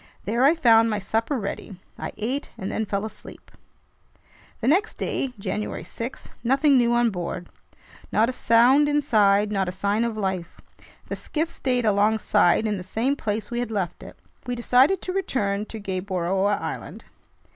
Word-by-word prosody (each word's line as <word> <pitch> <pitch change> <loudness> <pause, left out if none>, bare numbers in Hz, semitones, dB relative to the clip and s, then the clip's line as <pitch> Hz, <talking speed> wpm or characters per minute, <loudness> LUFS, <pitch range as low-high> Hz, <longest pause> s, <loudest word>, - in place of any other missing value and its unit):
There 230 +6 +1
I 290 +5 +6
found 230 -7 +5
my 210 - 0
supper 225 +7 -1
ready. 200 -2 -5 0.2
I - - -5
ate 255 +7 -3
and 190 - -4
then 220 -1 -2
fell 200 +1 -2
asleep. 220 - -11 1.1
The 235 - -2
next 380 +10 +2
day, 265 -2 -2
January 210 +1 -4
6: 235 +3 -7
nothing 275 +4 +3
new 240 -2 +4
on 240 -1 +3
board. 175 -1 -5 0.6
Not 220 +2 +3
a 255 - -2
sound 255 +5 +4
inside, 210 -8 +3
not 195 -3 0
a - - -3
sign 200 +4 0
of 230 -2 -2
life. 190 -4 -3 0.5
The - - -2
skiff 325 +2 -3
stayed 250 -5 -1
alongside 210 -1 +3
in 210 -3 -1
the - - -7
same 230 +9 0
place 215 -4 -3
we 240 - -2
had 245 - -2
left 195 -6 -3
it. - - -11 0.3
We 245 - -1
decided 255 +9 +3
to 365 - -3
return 210 - -1
to 225 - -7
Gueboroa 190 0 -1
Island. - - -6
220 Hz, 165 wpm, -24 LUFS, 200-250 Hz, 1.1 s, I